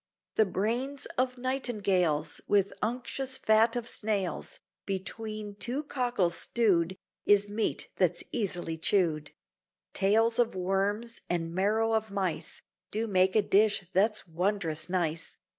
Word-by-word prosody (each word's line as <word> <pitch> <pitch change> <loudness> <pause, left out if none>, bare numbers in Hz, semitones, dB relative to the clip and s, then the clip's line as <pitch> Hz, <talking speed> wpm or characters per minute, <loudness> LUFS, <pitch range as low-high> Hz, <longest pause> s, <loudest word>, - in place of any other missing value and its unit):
The 220 - +3
brains 240 +9 -2
of 255 0 0
nightingales, 200 - 0
With 200 -1 +2
unctuous 255 +3 -1
fat 220 +1 +4
of 240 -1 -2
snails, 205 -4 -2 0.3
Between 210 +2 -4
two 245 +8 -2
cockles 245 - 0
stewed, 190 -6 +2 0.3
Is 205 0 +5
meat 210 +2 -2
that's 180 -2 +1
easily 175 -7 -2
chewed; 160 -4 +1 0.6
Tails 225 +4 +3
of 235 -5 +2
worms 200 +5 -1
and 165 -1 -1
marrow 215 +4 +2
of 220 0 0
mice 195 -4 -3 0.3
Do 220 +2 -1
make 190 -2 +3
a 215 - +5
dish 200 -3 +3
that's 210 +2 +2
wondrous 170 -2 -1
nice. 165 -3 -2
205 Hz, 125 wpm, -29 LUFS, 185-225 Hz, 0.6 s, Is